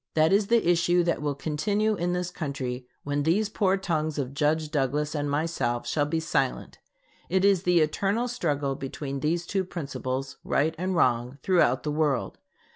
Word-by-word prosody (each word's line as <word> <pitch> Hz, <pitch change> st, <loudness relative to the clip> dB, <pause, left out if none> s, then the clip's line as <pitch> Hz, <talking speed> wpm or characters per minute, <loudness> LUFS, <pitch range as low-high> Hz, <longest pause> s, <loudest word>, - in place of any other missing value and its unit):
That 160 Hz, +2 st, +4 dB
is 200 Hz, 0 st, +3 dB
the 230 Hz, -5 st, +3 dB
issue 175 Hz, 0 st, +3 dB
that 170 Hz, -2 st, 0 dB
will 145 Hz, -1 st, -1 dB
continue 205 Hz, +10 st, 0 dB
in 175 Hz, -3 st, -1 dB
this 180 Hz, 0 st, -2 dB
country 130 Hz, -5 st, -4 dB, 0.2 s
when 145 Hz, 0 st, -1 dB
these 190 Hz, +8 st, +2 dB
poor 195 Hz, -3 st, +1 dB
tongues 155 Hz, -5 st, -1 dB
of 135 Hz, -2 st, -3 dB
Judge 150 Hz, +2 st, 0 dB
Douglas 145 Hz, +1 st, 0 dB
and 145 Hz, -2 st, -1 dB
myself 145 Hz, -5 st, -1 dB
shall 145 Hz, -1 st, +1 dB
be 160 Hz, +2 st, 0 dB
silent. 160 Hz, -, -1 dB, 0.5 s
It 190 Hz, +1 st, +2 dB
is 195 Hz, -3 st, +4 dB
the 180 Hz, -2 st, +3 dB
eternal 200 Hz, +9 st, 0 dB
struggle 145 Hz, -, -1 dB
between 135 Hz, +1 st, -5 dB
these 165 Hz, +4 st, 0 dB
two 195 Hz, +1 st, -1 dB
principles 135 Hz, -6 st, -4 dB
right 155 Hz, +3 st, +1 dB
and 185 Hz, +1 st, -1 dB
wrong 125 Hz, -3 st, +1 dB
throughout 170 Hz, -9 st, +3 dB
the 150 Hz, -, -1 dB
world. 145 Hz, -4 st, 0 dB
155 Hz, 175 wpm, -27 LUFS, 140-180 Hz, 0.5 s, That